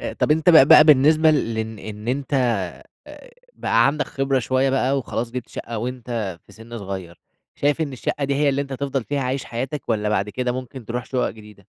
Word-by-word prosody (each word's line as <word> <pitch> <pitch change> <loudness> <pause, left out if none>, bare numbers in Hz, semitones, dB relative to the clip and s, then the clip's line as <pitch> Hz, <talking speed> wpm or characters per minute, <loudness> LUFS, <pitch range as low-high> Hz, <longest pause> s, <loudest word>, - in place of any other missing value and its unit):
أ - - -4
طب - - -1
أنت 160 +3 +4
بقى 160 -5 +8
بقى 150 - +8
بالنسبة 155 +2 +5
لإن 110 -6 -2
إن 105 +2 -8
أنت 140 +2 -2 1.2
بقى - - +2
عندك 145 +2 0
خبرة 135 -1 0
شوية 130 +2 +1
بقى 135 +1 +1
وخلاص 120 -2 -4
جِبت 125 -1 -6
شقة 115 -1 -6
وأنت 115 -6 -4
في - - -17
سِن 115 +1 -10
صغير، 95 -4 -7 0.3
شايف 145 +3 0
إن 150 -4 -2
الشقة 140 +3 -3
دي 140 0 0
هي 145 +1 +2
اللي 140 +1 +1
أنت 140 - -8
تفضَل 135 -2 -3
فيها 145 -1 -2
عايش 130 +1 -2
حياتك 130 +4 -5
والّا 105 -2 0
بعد 105 -1 0
كده 125 +2 -2
ممكن 130 -1 -7
ترُوح 120 +2 -4
شقق 130 -2 -1
جديدة؟ 105 -2 -15
130 Hz, 200 wpm, -22 LUFS, 115-140 Hz, 1.2 s, بقى